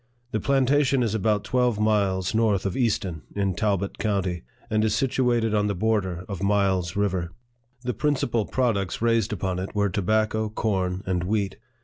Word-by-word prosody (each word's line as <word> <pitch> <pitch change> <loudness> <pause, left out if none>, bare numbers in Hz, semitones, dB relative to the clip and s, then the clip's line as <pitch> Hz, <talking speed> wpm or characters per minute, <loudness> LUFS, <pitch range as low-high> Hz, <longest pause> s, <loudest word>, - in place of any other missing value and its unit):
The 110 - 0
planta 140 +2 +3
tion 135 -2 +2
is 110 -3 0
about 105 -1 +1
twelve 125 -4 +1
miles 100 -3 +1
north 110 -4 +2
of 95 - -1
Easton, 100 - 0
in 100 -2 0
Talbot 100 -1 -1
county, 95 -5 -1 0.3
and 110 0 +1
is 110 -1 +1
situated 120 -2 +1
on 105 -1 +2
the 100 - -1
border 95 -3 0
of 95 -3 -5
Miles 95 -4 +1
River. 95 -4 0 0.5
The 125 0 -1
principal 120 -4 0
products 110 -8 0
raised 115 -2 +2
upon 95 -2 -2
it 95 +3 -6
were 105 -1 +2
tobacco, 110 +3 0
corn, 95 -4 -1
and 90 -2 -1
wheat. 100 0 -1
105 Hz, 165 wpm, -25 LUFS, 95-115 Hz, 0.5 s, planta